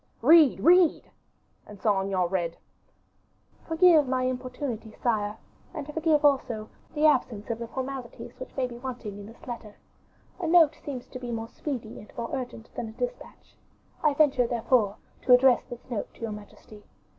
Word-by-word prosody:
"Read, 310 Hz, +1 st, +7 dB
read!" 350 Hz, 0 st, +4 dB, 0.6 s
And 210 Hz, -1 st, -12 dB
Saint 195 Hz, -3 st, +1 dB
Aignan 185 Hz, -2 st, +1 dB
read: 170 Hz, -3 st, -2 dB, 1.1 s
"Forgive 325 Hz, -3 st, +5 dB
my 255 Hz, 0 st, 0 dB
importunity, 250 Hz, -3 st, -4 dB
sire; 215 Hz, -3 st, -1 dB, 0.4 s
and 300 Hz, -1 st, -6 dB
forgive, 310 Hz, -2 st, +2 dB
also, 245 Hz, -6 st, +1 dB, 0.3 s
the 300 Hz, +1 st, +2 dB
absence 245 Hz, -7 st, +2 dB
of 230 Hz, -, -3 dB
the 235 Hz, -, -5 dB
formalities 260 Hz, -2 st, -6 dB
which 255 Hz, -, -9 dB
may 260 Hz, -, +1 dB
be 240 Hz, -1 st, -8 dB
wanting 240 Hz, -6 st, -6 dB
in 200 Hz, -, -9 dB
this 225 Hz, -, -15 dB
letter. 230 Hz, -4 st, -7 dB, 0.6 s
A 345 Hz, -, -2 dB
note 325 Hz, -2 st, +6 dB
seems 260 Hz, -4 st, -6 dB
to 255 Hz, -, -7 dB
be 245 Hz, -1 st, -6 dB
more 225 Hz, -1 st, -4 dB
speedy 245 Hz, -7 st, -6 dB
and 210 Hz, -, -14 dB
more 235 Hz, -1 st, -4 dB
urgent 245 Hz, -3 st, -7 dB
than 230 Hz, -, -4 dB
a -, -, -11 dB
dispatch. -, -, -6 dB, 0.5 s
I 295 Hz, -2 st, +3 dB
venture, 275 Hz, -5 st, +3 dB
therefore, 230 Hz, -3 st, +1 dB, 0.3 s
to 250 Hz, -, +5 dB
address 250 Hz, 0 st, +5 dB
this 245 Hz, -1 st, -10 dB
note 235 Hz, -5 st, -4 dB
to -, -, -20 dB
your 225 Hz, -1 st, -3 dB
majesty. 210 Hz, 0 st, -11 dB
250 Hz, 170 wpm, -27 LUFS, 220-285 Hz, 1.1 s, Read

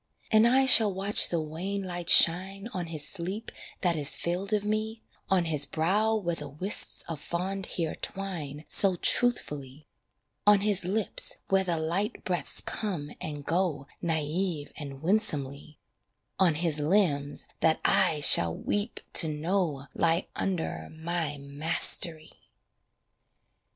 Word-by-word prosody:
And 220 Hz, +1 st, +5 dB
I 265 Hz, +2 st, +3 dB
shall 225 Hz, -5 st, +7 dB
watch 195 Hz, +2 st, 0 dB
the 170 Hz, -, -1 dB
wan 175 Hz, +6 st, -5 dB
light 175 Hz, -2 st, -4 dB
shine 190 Hz, +5 st, +5 dB
On 180 Hz, -4 st, -5 dB
his 155 Hz, -3 st, -1 dB
sleep 195 Hz, +4 st, -4 dB, 0.3 s
that 175 Hz, -3 st, +1 dB
is 145 Hz, -2 st, -1 dB
filled 180 Hz, +4 st, -3 dB
of 210 Hz, -1 st, -1 dB
me, 215 Hz, +1 st, -3 dB, 0.3 s
On 185 Hz, -3 st, +1 dB
his 150 Hz, -3 st, +1 dB
brow 200 Hz, +9 st, 0 dB
where 175 Hz, -6 st, -2 dB
the -, -, -7 dB
wisps 185 Hz, +9 st, +2 dB
of 165 Hz, -3 st, -7 dB
fond 190 Hz, +3 st, -4 dB
hair 165 Hz, -3 st, -4 dB
twine 160 Hz, -7 st, -7 dB
So 195 Hz, -2 st, +5 dB
truthfully, 150 Hz, -, 0 dB, 0.6 s
On 205 Hz, -1 st, +5 dB
his 200 Hz, -3 st, 0 dB
lips 205 Hz, +3 st, -3 dB
where 195 Hz, 0 st, +2 dB
the 175 Hz, -3 st, -1 dB
light 175 Hz, +8 st, -3 dB
breaths 180 Hz, -2 st, -1 dB
come 175 Hz, -9 st, -5 dB
and 145 Hz, -2 st, -7 dB
go 165 Hz, -5 st, -2 dB, 0.2 s
Naïve 160 Hz, 0 st, -3 dB
and 140 Hz, -1 st, -9 dB
winsomely, 150 Hz, -7 st, -2 dB, 0.6 s
On 175 Hz, -5 st, +3 dB
his 160 Hz, -1 st, -1 dB
limbs 150 Hz, -4 st, 0 dB
that 160 Hz, -1 st, +2 dB
I 150 Hz, -2 st, +2 dB
shall 85 Hz, -, +6 dB
weep 205 Hz, +3 st, -4 dB
to 165 Hz, -, +5 dB
know 155 Hz, -2 st, -2 dB
Lie 165 Hz, +2 st, 0 dB
under 160 Hz, -, -4 dB
my 160 Hz, -2 st, -4 dB
mastery. 155 Hz, +3 st, +2 dB
170 Hz, 135 wpm, -27 LUFS, 150-195 Hz, 0.6 s, shall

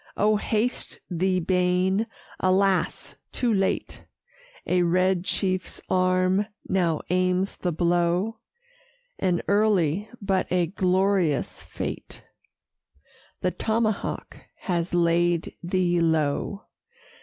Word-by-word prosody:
O 215 Hz, +1 st, +3 dB
haste 220 Hz, +3 st, -1 dB
thee, 185 Hz, +2 st, +1 dB
Baen! 180 Hz, +4 st, +1 dB, 0.3 s
alas! 190 Hz, 0 st, +1 dB
too 240 Hz, -3 st, 0 dB
late; 195 Hz, -1 st, -1 dB, 0.6 s
A 180 Hz, 0 st, +2 dB
red 180 Hz, +1 st, +2 dB
chief's 185 Hz, -1 st, -2 dB
arm 185 Hz, +2 st, +2 dB, 0.2 s
now 175 Hz, -4 st, +1 dB
aims 185 Hz, +1 st, +1 dB
the 180 Hz, -, -1 dB
blow 175 Hz, +6 st, +1 dB, 0.8 s
(An 175 Hz, -2 st, +1 dB
early, 200 Hz, -3 st, +2 dB
but 195 Hz, -2 st, -1 dB
a 180 Hz, -1 st, +3 dB
glorious 185 Hz, -3 st, +1 dB
fate); -, -, -6 dB, 1.2 s
The 180 Hz, -, +1 dB
tomahawk 220 Hz, 0 st, -2 dB, 0.2 s
has 175 Hz, -1 st, -1 dB
laid 170 Hz, 0 st, +2 dB
thee 175 Hz, 0 st, +1 dB
low. 160 Hz, +5 st, 0 dB
185 Hz, 95 wpm, -25 LUFS, 175-195 Hz, 1.2 s, O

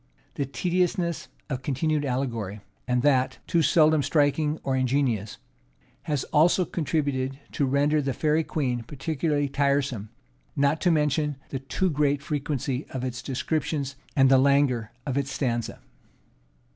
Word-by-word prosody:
The 140 Hz, -, -2 dB
tediousness 175 Hz, +2 st, -1 dB, 0.2 s
of 130 Hz, -3 st, -3 dB
continued 145 Hz, +2 st, 0 dB
allegory, 115 Hz, -6 st, -3 dB, 0.3 s
and 125 Hz, 0 st, +1 dB
that, 130 Hz, -3 st, +2 dB
too, 170 Hz, -, +2 dB
seldom 155 Hz, 0 st, +4 dB
striking 150 Hz, +2 st, +1 dB
or 135 Hz, -, 0 dB
ingenious, 130 Hz, -5 st, 0 dB, 0.7 s
has 145 Hz, -4 st, 0 dB
also 170 Hz, +4 st, +4 dB
contributed 140 Hz, -5 st, -1 dB
to 140 Hz, -, 0 dB
render 145 Hz, +3 st, +2 dB
the 135 Hz, -1 st, -1 dB
Fairy 155 Hz, +3 st, +2 dB
Queen 130 Hz, -6 st, -1 dB
peculiarly 145 Hz, +3 st, -1 dB
tiresome; 140 Hz, -6 st, 0 dB, 0.5 s
not 140 Hz, +2 st, +2 dB
to 180 Hz, -, +3 dB
mention 150 Hz, -2 st, +1 dB
the 135 Hz, -, -3 dB
too 165 Hz, +7 st, -1 dB
great 145 Hz, -1 st, +1 dB
frequency 145 Hz, -3 st, -2 dB
of 130 Hz, -1 st, -5 dB
its 125 Hz, -1 st, -4 dB
descriptions, 140 Hz, 0 st, -2 dB, 0.2 s
and 135 Hz, -1 st, +5 dB
the 135 Hz, -1 st, +6 dB
languor 135 Hz, -5 st, +2 dB
of 140 Hz, 0 st, 0 dB
its 140 Hz, 0 st, -3 dB
stanza. 120 Hz, -5 st, -2 dB
140 Hz, 135 wpm, -26 LUFS, 130-150 Hz, 0.7 s, the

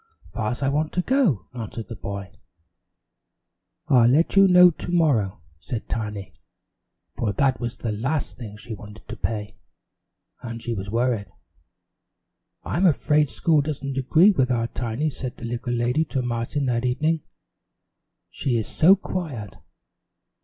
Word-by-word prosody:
"Far's 120 Hz, +5 st, -2 dB
I 135 Hz, -, +2 dB
want 150 Hz, +2 st, -1 dB
to 180 Hz, -, 0 dB
go," 250 Hz, -, +2 dB
answered 115 Hz, -2 st, -6 dB
the 115 Hz, -, -7 dB
boy. 100 Hz, -1 st, -6 dB, 1.6 s
"I'll 120 Hz, -3 st, +5 dB
let 155 Hz, +9 st, +3 dB
you 195 Hz, 0 st, +7 dB
know 180 Hz, -1 st, +8 dB
to 170 Hz, -, -7 dB
morrow," 120 Hz, -, +1 dB, 0.2 s
said 115 Hz, +6 st, -5 dB
Tiny, 105 Hz, -4 st, -4 dB, 0.8 s
for 105 Hz, -3 st, -1 dB
that 130 Hz, +1 st, +1 dB
was 120 Hz, 0 st, -4 dB
the 115 Hz, -, -3 dB
last 135 Hz, +8 st, -2 dB
thing 105 Hz, -4 st, -9 dB
she 110 Hz, +1 st, -7 dB
wanted 105 Hz, +1 st, -11 dB
to 115 Hz, -, -5 dB
pay, 110 Hz, -2 st, -4 dB, 0.8 s
and 115 Hz, -2 st, -6 dB
she 120 Hz, 0 st, -3 dB
was 100 Hz, -2 st, -5 dB
worried. 115 Hz, -3 st, 0 dB, 1.3 s
"I'm 185 Hz, +4 st, +2 dB
afraid 150 Hz, -2 st, +2 dB
school 150 Hz, +7 st, +2 dB
doesn't 140 Hz, -2 st, -4 dB
agree 160 Hz, +9 st, +5 dB
with 130 Hz, -9 st, +1 dB
our 115 Hz, -2 st, +1 dB
Tiny," 125 Hz, +6 st, -2 dB
said 130 Hz, -2 st, -6 dB
the 120 Hz, -, -7 dB
little 120 Hz, +1 st, -3 dB
lady 120 Hz, +6 st, +1 dB
to 135 Hz, -4 st, -2 dB
Martin 120 Hz, +4 st, -2 dB
that 120 Hz, -2 st, 0 dB
evening, 155 Hz, +6 st, +1 dB, 1.1 s
"she 125 Hz, -4 st, -1 dB
is 110 Hz, -, -2 dB
so 180 Hz, +5 st, +5 dB
quiet." 150 Hz, -, -5 dB
125 Hz, 145 wpm, -24 LUFS, 110-150 Hz, 1.6 s, know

